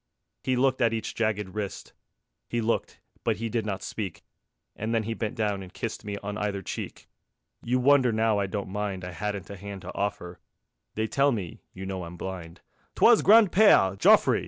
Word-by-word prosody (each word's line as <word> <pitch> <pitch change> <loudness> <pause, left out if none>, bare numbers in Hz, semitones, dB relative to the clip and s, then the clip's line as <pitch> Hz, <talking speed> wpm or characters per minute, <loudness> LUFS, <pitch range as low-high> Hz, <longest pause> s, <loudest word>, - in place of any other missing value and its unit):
He 130 - +1
looked 130 +1 +2
at 115 -2 +3
each 110 -1 -3
jagged 105 -3 -1
wrist; 105 -2 -5 0.6
He 120 - -1
looked, 115 0 -1 0.2
but - - +1
he 115 +1 -4
did 110 -1 -1
not 95 -2 -3
speak; 95 -6 -5 0.5
And 110 +2 -2
then 115 - +1
he 115 +2 -3
bent 110 -1 -3
down 105 -3 -1
and 90 -1 -10
kissed 110 +2 -5
Me 105 -1 -4
on 105 +1 -4
either 100 -2 -2
cheek. - - -6 0.5
You 125 +2 0
wonder 130 -1 +4
now 110 -1 +2
I 100 - 0
don't 100 -1 -4
mind 100 -2 -3
I 90 - -6
hadn't 100 +2 -4
a - - -6
hand 100 0 -8
to - - -7
offer.... 100 -3 -3 0.6
They 110 - 0
tell 140 +5 +2
me 100 -9 -4
(you 95 - -8
know 95 -1 -4
I'm 85 +1 -8
blind) 85 -2 -7 0.3
_'TWAS 235 -2 +6
GRAND 215 -2 +7
PEÈRE 170 - +5
JOFFRE. - - +5
105 Hz, 195 wpm, -27 LUFS, 95-115 Hz, 0.6 s, GRAND